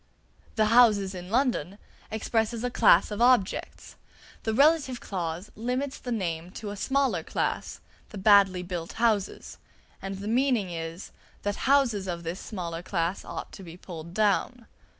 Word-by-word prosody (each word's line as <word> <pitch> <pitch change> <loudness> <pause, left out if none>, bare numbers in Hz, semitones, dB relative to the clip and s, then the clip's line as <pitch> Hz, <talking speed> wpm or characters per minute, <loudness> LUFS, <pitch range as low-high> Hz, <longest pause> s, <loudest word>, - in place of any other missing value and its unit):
"The 215 -2 +3
houses 210 -5 +5
in 180 -1 -8
London" 225 - 0 0.3
expresses 225 +1 -1
a 250 - -1
class 210 -5 +5
of 210 +2 -3
objects; 240 -5 +1 0.4
the 220 - -1
relative 275 0 +3
clause 175 0 -5
limits 250 +5 -3
the 245 - -6
name 175 -6 -2
to 210 -2 -6
a - - -6
smaller 265 -4 0
class, - - -3 0.3
the 210 - -9
badly 195 -2 +5
built 175 -2 -5
houses; 220 -4 -1 0.4
and 195 0 -5
the 200 +2 -6
meaning 235 -5 +1
is, 165 +1 -6 0.3
that 205 0 -1
houses 240 -9 +3
of 170 -1 -4
this 170 +3 -4
smaller 170 -5 -5
class 175 0 -2
ought - - -7
to - - -11
be 170 -2 -10
pulled 170 -1 -9
down. 215 +3 +1
205 Hz, 150 wpm, -27 LUFS, 180-235 Hz, 0.4 s, houses